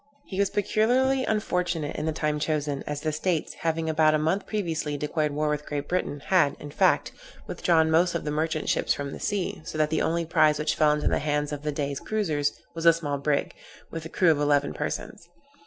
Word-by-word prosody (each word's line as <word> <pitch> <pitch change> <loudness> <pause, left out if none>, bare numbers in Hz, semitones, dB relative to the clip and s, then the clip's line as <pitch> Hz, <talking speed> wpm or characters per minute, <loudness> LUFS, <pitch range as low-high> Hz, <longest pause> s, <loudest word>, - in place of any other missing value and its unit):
He 190 - -5
was 200 -1 +3
peculiarly 255 +6 +2
unfortunate 180 -7 -1
in 155 - -3
the - - +1
time 150 -1 -1
chosen, 150 -2 -1
as 150 0 -3
the 155 - -1
States, 160 +1 -1
having 165 0 -1
about 155 -1 +3
a - - +3
month 160 +6 0
previously 165 -8 -2
declared 150 +1 -1
war 150 +1 -1
with 150 0 -2
Great 145 -1 -3
Britain, 160 -5 -2
had, 155 -1 +3
in 145 - -8
fact, - - +2 0.3
withdrawn 160 -2 +2
most 170 +2 +3
of 170 - -2
the 150 - -1
merchant 155 +1 -1
ships - - +1
from 140 -1 -5
the - - -7
sea, 200 -2 -2
so 155 - -6
that 155 0 +1
the 160 - +1
only 170 +1 0
prize 155 -2 +3
which 150 - 0
fell 150 -1 +3
into 150 0 -1
the - - +1
hands 150 0 -1
of 145 -1 -4
the 150 0 -2
Dey's 140 -1 -3
cruizers 155 -10 0 0.2
was 165 0 -1
a 165 - +9
small 145 -4 -3
brig, 140 0 0 0.4
with 165 -1 -5
a 160 - -7
crew 175 -1 +3
of 150 - +1
eleven 145 -1 +2
persons. 155 +3 -5
155 Hz, 220 wpm, -26 LUFS, 150-170 Hz, 0.4 s, a